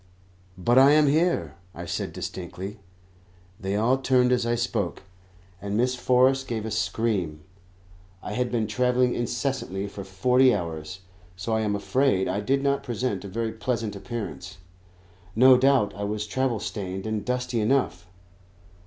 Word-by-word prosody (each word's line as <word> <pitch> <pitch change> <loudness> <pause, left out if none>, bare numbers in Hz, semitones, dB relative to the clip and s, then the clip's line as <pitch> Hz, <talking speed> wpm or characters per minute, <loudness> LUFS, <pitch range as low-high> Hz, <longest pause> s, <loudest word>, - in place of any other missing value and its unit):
"But 120 +8 +4
I 140 +2 +7
am 150 0 +5
here," 160 +5 +1 0.2
I - - -6
said - - -3
distinctly. 95 +3 -6 0.8
They 95 +1 -2
all 120 +5 +2
turned 125 -2 +3
as 125 -2 +1
I 120 - +1
spoke, 115 -7 -2 0.6
and 100 +1 -2
Miss 125 +2 +2
Forrest 130 +2 +2
gave 110 -2 -3
a 110 - -4
scream. 95 -5 -1 0.8
I - - -5
had 125 +1 -1
been 115 -3 0
travelling 125 +3 +1
incessantly 120 -5 -2
for 100 0 -8
forty 125 +7 +3
hours, 85 0 -5 0.3
so 100 +5 -3
I 110 - +1
am 105 -1 0
afraid 115 -2 +1
I 100 - -1
did 135 +6 0
not 140 0 +1
present 120 -5 -3
a - - -6
very 115 +3 -2
pleasant 115 -2 -3
appearance. 100 -4 -6 0.8
No 130 +3 +7
doubt 130 -4 +3
I 100 - -5
was 105 +1 -2
travel 125 +1 -1
stained 95 -2 -5
and 110 -2 -2
dusty 125 0 -1
enough. 125 -4 0
115 Hz, 155 wpm, -25 LUFS, 100-125 Hz, 0.8 s, I